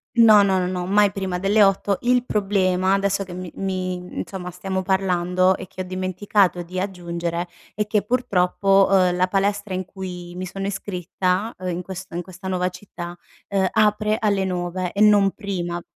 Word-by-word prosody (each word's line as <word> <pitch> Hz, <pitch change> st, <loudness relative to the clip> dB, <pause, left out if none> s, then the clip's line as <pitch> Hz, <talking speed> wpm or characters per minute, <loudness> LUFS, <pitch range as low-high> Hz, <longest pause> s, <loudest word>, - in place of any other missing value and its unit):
No, 220 Hz, -3 st, +7 dB
no, 190 Hz, -1 st, +2 dB
no, 180 Hz, -, 0 dB
no, 180 Hz, -1 st, -3 dB
mai 205 Hz, +1 st, +4 dB
prima 190 Hz, -2 st, -3 dB
delle 205 Hz, +3 st, +4 dB
8:00. 195 Hz, 0 st, +2 dB
Il 245 Hz, 0 st, +3 dB
problema, 195 Hz, -4 st, +1 dB
adesso 195 Hz, 0 st, +1 dB
che 180 Hz, -, -10 dB
mi 180 Hz, -1 st, -7 dB
mi 185 Hz, -1 st, -2 dB, 0.2 s
insomma, 180 Hz, -2 st, -5 dB
stiamo 190 Hz, +1 st, -3 dB
parlando 185 Hz, -1 st, +2 dB
e -, -, -7 dB
che 185 Hz, -, -8 dB
ho -, -, -2 dB
dimenticato 185 Hz, 0 st, 0 dB
di 180 Hz, +2 st, -5 dB
aggiungere, 175 Hz, -2 st, -3 dB, 0.3 s
è 210 Hz, 0 st, -2 dB
che 210 Hz, -1 st, +1 dB
purtroppo, 195 Hz, -4 st, +2 dB
uhm, 185 Hz, -2 st, +4 dB
la 180 Hz, +1 st, +3 dB
palestra 200 Hz, +1 st, 0 dB
in 185 Hz, 0 st, -2 dB
cui 180 Hz, -2 st, -8 dB
mi 185 Hz, +1 st, -4 dB
sono 195 Hz, +2 st, -4 dB
iscritta, 190 Hz, +1 st, -2 dB
uhm, 185 Hz, 0 st, -6 dB
in 175 Hz, 0 st, -2 dB
questo 190 Hz, 0 st, -8 dB
in 175 Hz, -, -2 dB
questa 185 Hz, +1 st, -10 dB
nuova 180 Hz, -1 st, 0 dB
città, 175 Hz, -2 st, -9 dB, 0.3 s
uhm, 195 Hz, -2 st, +2 dB
apre 215 Hz, 0 st, +2 dB
alle 200 Hz, -3 st, +1 dB
9:00 180 Hz, 0 st, -2 dB
e 200 Hz, -, -2 dB
non 205 Hz, -2 st, +6 dB
prima. 175 Hz, -5 st, -4 dB
190 Hz, 180 wpm, -22 LUFS, 180-200 Hz, 0.3 s, No